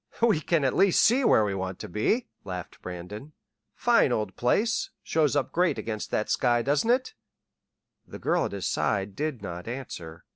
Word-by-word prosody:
"We 220 -9 +4
can 165 -1 +1
at 130 - +1
least 195 -2 +4
see 255 +4 +4
where 110 - +5
we 100 - -1
want 95 -1 -4
to - - -6
be," 160 - 0 0.2
laughed 90 -2 -7
Brandon. 95 - -8 0.4
"Fine - - +3
old 105 -3 -1
place 210 - +1
shows 150 -3 +1
up 145 - 0
great 175 -6 +2
against 110 -1 -4
that 105 - -1
sky; 120 -2 +2
doesn't 145 - +1
it?" 255 - +2 0.9
The - - -9
girl - - +1
at - - -4
his - - -4
side 100 -1 -1
did 150 -7 -3
not 90 0 -6
answer. 90 -10 -7
120 Hz, 180 wpm, -27 LUFS, 95-160 Hz, 0.9 s, where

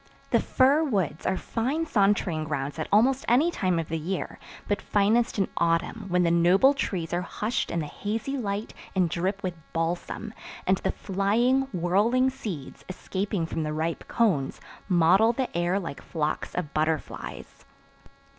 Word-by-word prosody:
The - - +5
fir 275 +4 +3
woods 190 - -1
are 190 - +1
fine 270 +8 -1
sauntering 195 - +1
grounds 145 0 -3
at 155 - -2
almost 250 +6 +4
any 280 +9 +4
time 185 - 0
of 165 -2 -2
the 165 0 -2
year, 180 +4 -4 0.3
but 205 - 0
finest 215 +4 +2
in 195 - +2
autumn 170 +6 0
when 180 -1 +2
the 170 - +3
noble 180 +10 +5
trees 185 - -3
are 175 - +1
hushed 215 +5 -2
in 170 - -1
the - - -3
hazy 220 - -3
light 210 -4 -3 0.2
and 185 -2 +3
drip 190 +4 -1
with 185 -1 -1 0.2
balsam; 170 +6 -2 0.3
and 190 +1 +3
the - - 0
flying, 235 +8 +1
whirling 210 +9 +2
seeds, 200 - -7
escaping 190 -1 -2
from 160 - -3
the 150 -1 -2
ripe 160 +2 -2
cones, 180 - +1 0.3
mottle 185 +6 +5
the 255 -4 -3
air 175 +3 +1
like 165 -7 -6
flocks 155 -3 -3
of 175 -4 -3
butterflies. 155 0 -3
190 Hz, 160 wpm, -27 LUFS, 165-225 Hz, 0.3 s, The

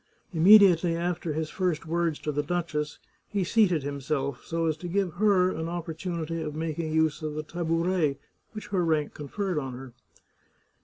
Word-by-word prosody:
Immediately 180 -1 +6
after 170 -1 -2
his 155 +1 -3
first 180 -4 -1
words 165 -1 0
to 150 - -3
the 145 0 0
duchess 150 -2 -2 0.3
he 200 -2 -1
seated 180 -6 +3
himself, 140 -2 -3
so 165 0 -2
as 160 -1 +1
to 175 - -7
give 185 -1 0
her 185 -1 +3
an 160 -1 -4
opportunity 170 -1 -4
of 150 -1 -4
making 160 0 -3
use 160 -1 +1
of 155 -1 -4
the 155 - -3
tabouret 165 -2 0 0.4
which 215 -1 -8
her 190 -4 +1
rank 155 -3 0
conferred 180 +3 -3
on 135 -3 -5
her. 130 0 -9
165 Hz, 165 wpm, -27 LUFS, 150-175 Hz, 0.4 s, Immediately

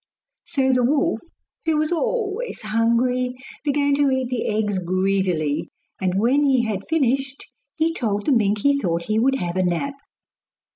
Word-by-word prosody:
So 270 -6 +1
the 250 -1 +2
wolf, 275 -3 +1 0.4
who 320 -1 +2
was 310 +1 0
always 445 +5 -2
hungry, 235 +3 +1 0.3
began 285 -1 +1
to 285 -1 +3
eat 260 -2 0
the 250 -2 -2
eggs 210 -2 0
greedily; 185 -4 0 0.3
and 185 0 0
when 255 +7 +3
he 265 -4 +3
had 205 -4 -3
finished 270 -3 0 0.3
he 325 +1 +1
told 210 -8 -2
the - - +2
mink 210 -4 +2
he 280 0 +3
thought 170 -6 -1
he 215 +4 0
would 270 +3 +3
have 175 -6 -3
a 185 - +2
nap. 180 +11 -1
250 Hz, 160 wpm, -22 LUFS, 200-280 Hz, 0.4 s, to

